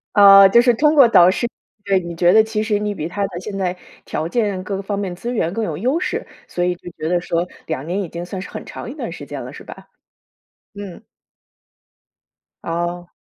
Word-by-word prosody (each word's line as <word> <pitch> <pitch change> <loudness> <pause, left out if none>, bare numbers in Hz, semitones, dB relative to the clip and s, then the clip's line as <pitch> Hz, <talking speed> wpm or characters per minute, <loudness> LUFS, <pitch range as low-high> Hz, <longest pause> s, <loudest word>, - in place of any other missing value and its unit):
啊， 195 -1 +9
就 235 +5 +5
是 245 0 +4
通 300 +6 +3
过 275 -5 +8
导 185 -5 +6
师 240 - -1 0.4
对， 195 -1 +2
你 170 -2 -7
觉 175 +1 +4
得 220 0 +7
其 220 -1 -2
实 215 -1 0
你 210 0 -2
比 160 -4 -4
她 200 +4 -3
的 175 -3 -6
现 195 +1 -6
在 185 -2 -2 0.3
条 155 - -3
件 200 -2 -1
各 195 +1 -4
个 195 - -4
方 200 0 -3
面 185 -3 -4
资 240 +6 -5
源 170 -6 -1
更 225 - -2
有 160 -7 -3
优 255 - 0
势， - - -3 0.2
所 175 - -2
以 180 0 0
就 175 - -11
觉 155 - -4
得 175 +1 +1
说 170 0 -1 0.2
2 150 -3 -4
年 190 +4 -1
已 170 - -7
经 170 +1 -6
算 185 +1 -6
是 - - -8
很 - - -8
长 - - -8
一 - - -7
段 - - -6
时 - - -8
间 - - -7
了， - - -9
是 - - -11
吧？ - - -12 0.9
嗯。 200 -3 -9 1.6
哦。 175 +1 -4
190 Hz, 240 characters per minute, -20 LUFS, 175-210 Hz, 1.6 s, 啊